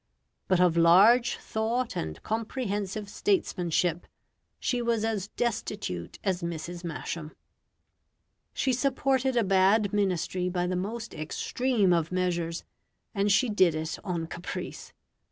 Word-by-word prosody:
But 185 -2 +3
of 180 -2 +4
large 200 +9 +6
thought 230 +3 -2
and 80 0 -4
comprehensive 210 -3 -3
statesmanship 180 - 0 0.5
she 245 -1 0
was 230 -2 +1
as 210 -3 -1
destitute 210 - -3
as 190 -2 0
Mrs. 170 +1 -5
Masham. 165 -1 -5 1.2
She 260 - 0
supported 265 0 +1
a 235 - +4
bad 195 +2 +3
Ministry 180 -2 0
by 175 -1 -1
the 180 +1 -1
most 220 +5 -4
extreme 200 +6 0
of 165 -1 0
measures, 175 -2 -1 0.5
and 200 -1 +1
she 250 +6 +4
did 185 -7 +3
it 160 +1 -3
on 175 -5 -2
caprice. 170 +1 -6
195 Hz, 120 wpm, -28 LUFS, 175-225 Hz, 1.2 s, large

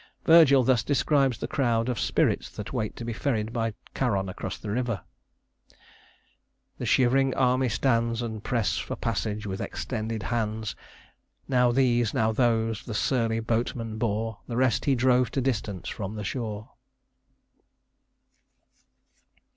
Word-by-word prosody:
Virgil 155 -5 +7
thus 125 -2 +3
describes 135 0 +2
the - - -4
crowd 120 -6 +1
of 125 -4 -1
spirits - - +1
that 105 +3 -8
wait 110 -5 -2
to 115 - -7
be 120 - -3
ferried 115 -3 -1
by 115 -1 0 0.2
Charon 100 -7 0
across 95 - -5
the 105 - -6
river: 115 -4 -1 1.8
"The - - -3
shivering 135 +1 +3
army 130 0 +2
stands, 115 -1 +1
And 110 -2 -5
press 115 -5 0
for - - -4
passage 105 0 -2
with 95 -1 -4
extended 110 -2 -4
hands, 110 -2 -2 0.7
Now 125 -2 +3
these, 120 -3 +2
now 110 0 +2
those, 115 -2 +1
the 110 - -6
surly 115 -2 +1
boatman 115 -1 -2
bore; 110 -1 -1
The 120 - -4
rest 130 -1 +2
he 140 -2 +3
drove 125 0 +3
to - - 0
distance 105 -8 -2
from 100 +1 -5
the 105 - -5
shore." 110 -1 -4
115 Hz, 140 wpm, -27 LUFS, 110-125 Hz, 1.8 s, Virgil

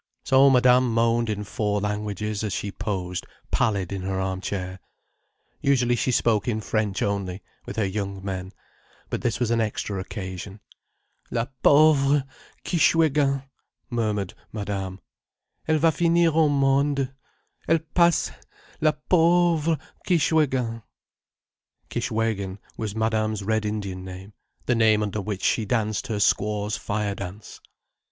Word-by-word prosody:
So 135 +1 +6
Madame 125 -1 +5
moaned 115 0 +2
in 105 -1 -2
four 105 0 -1
languages 105 0 -3
as 105 - -2
she 100 - -3
posed 90 -4 -4 0.2
pallid 100 -3 0
in 95 - -3
her 95 0 -2
arm 95 0 -2
chair. 95 -2 -4 0.8
Usually 125 -3 +3
she 130 - 0
spoke 110 -4 +2
in 110 -3 0
French 105 -1 -1
only, 100 -2 -2 0.2
with - - -5
her 110 - +1
young 100 -1 -4
men. 95 -1 -4 0.6
But - - -2
this 115 - -1
was 120 -2 0
an 115 0 +2
extra 105 -2 -2
occasion. 95 +1 -6 0.7
"La 115 0 -1 0.2
pauvre 145 -1 +5 0.4
Kishwégin!" 145 -4 +3 0.5
murmured 105 -5 -1 0.2
Madame. 100 -3 -4 0.7
"Elle 155 0 +3
va 160 +2 +4
finir 170 +1 +3
au 160 -1 +4
monde. 140 -1 +2 0.5
Elle 165 - +4
passe—la 170 -2 0
pauvre 170 -2 +3 0.3
Kishwégin." 135 -9 +2 1.1
Kishwégin 105 -4 -1 0.2
was 110 -2 -4
Madame's 110 -1 0
Red 110 +1 0
Indian 100 -3 -3
name, 95 +2 -9 0.3
the 125 - +2
name 110 -2 +4
under 105 0 -2
which 100 -1 -4
she 115 - +2
danced 110 0 -1
her 110 - -2
Squaw's 105 +1 +1
fire 105 -1 -2
dance. 100 +2 -8
110 Hz, 130 wpm, -25 LUFS, 100-135 Hz, 1.1 s, So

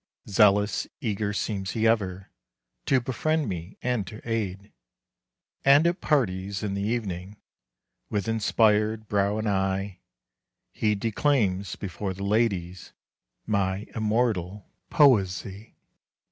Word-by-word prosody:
Zealous, 105 0 +3
eager 105 -5 -2
seems 100 -2 -3
he 110 0 0
ever 95 -4 0 0.6
To 135 - +4
befriend 150 +5 -1
me 90 -1 -6
and 125 -6 -1
to 110 - -9
aid. 105 -3 -3 0.9
And 140 +4 +6
at 175 +2 +1
parties 100 - 0
in 100 -2 -2
the 100 - -2
evening, 100 -3 -3 0.7
With 105 -1 -2
inspired 110 -1 +2
brow 100 0 +1
and 110 0 -2
eye, 95 -1 -1 0.7
He 105 -1 0
declaims 105 -4 0
before 95 0 -5
the 100 - -6
ladies 100 -5 -1 0.5
My 100 -1 0
immortal 105 -4 -1 0.2
poesy. 100 -6 +2
105 Hz, 110 wpm, -26 LUFS, 95-115 Hz, 0.9 s, And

